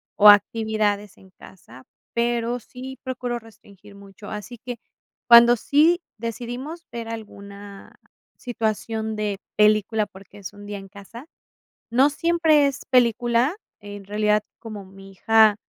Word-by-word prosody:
o, 210 -1 +8
actividades 210 -1 +2
en 190 -1 -20
casa, 130 -10 -16 0.3
pero, 235 0 -1
sí 260 +2 -10
procuro 250 -2 -4
restringir 205 -3 -18
mucho. 200 +1 -13
Así 210 +3 -7
que 245 -1 -6 0.5
cuando 235 0 +8
sí 310 +9 +3 0.2
decidimos 245 +8 -6
ver 230 -1 -6
alguna 200 -2 -10 0.4
situación 220 -2 -3
de 210 -2 -3 0.2
película, 215 +1 +3
porque 195 +1 -16
es 200 0 -9
un 205 0 -12
día 205 0 -5
en 195 0 -10
casa, 205 +6 -12 0.7
no 260 +5 +4
siempre 320 -1 +3
es 275 -2 -3
película, 240 - +2 0.2
en 205 -1 -10
realidad 210 +1 +1 0.2
como 215 -4 -9
mi 195 +1 -14
hija 220 +1 +4
220 Hz, 130 wpm, -23 LUFS, 205-240 Hz, 0.7 s, o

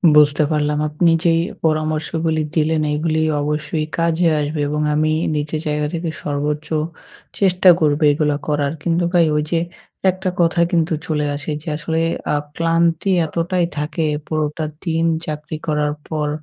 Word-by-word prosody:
বুঝতে 150 0 +5
পারলাম। 150 -1 +1
আপনি 165 +3 +2
যেই 165 -2 +3 0.3
পরামর্শগুলি 155 +1 0
দিলেন, 160 0 +2
এইগুলি 155 +1 0 0.2
অবশ্যই 150 +1 -2
কাজে 170 +1 +2
আসবে 150 +1 -2
এবং 150 +1 -1
আমি 155 +1 +2 0.2
নিজের 150 +1 -2
জায়গা 150 0 0
থেকে 170 0 -2
সর্বোচ্চ 150 +1 -2 0.7
চেষ্টা 185 -1 +5
করবো 150 0 +2
এগুলো 150 0 +1
করার। 145 -1 0
কিন্তু 170 0 +1
ভাই 170 -2 +5
ওইযে, 150 +3 0 0.5
একটা 185 +1 -1
কথা 170 0 +3
কিন্তু 165 -1 +1
চলে 150 -2 0
আসে। 145 +2 -5
যে - - -17
আসলে 160 +1 -2 0.3
আ - - +2 0.2
ক্লান্তি 165 +2 +1
এতটাই 175 +2 0
থাকে 150 +3 -2 0.2
পুরোটা 155 0 -1 0.2
দিন 165 -1 0 0.2
চাকরি 150 0 -5
করার 150 -1 +1 0.2
পর। 150 -2 -1
155 Hz, 145 wpm, -19 LUFS, 150-165 Hz, 0.7 s, বুঝতে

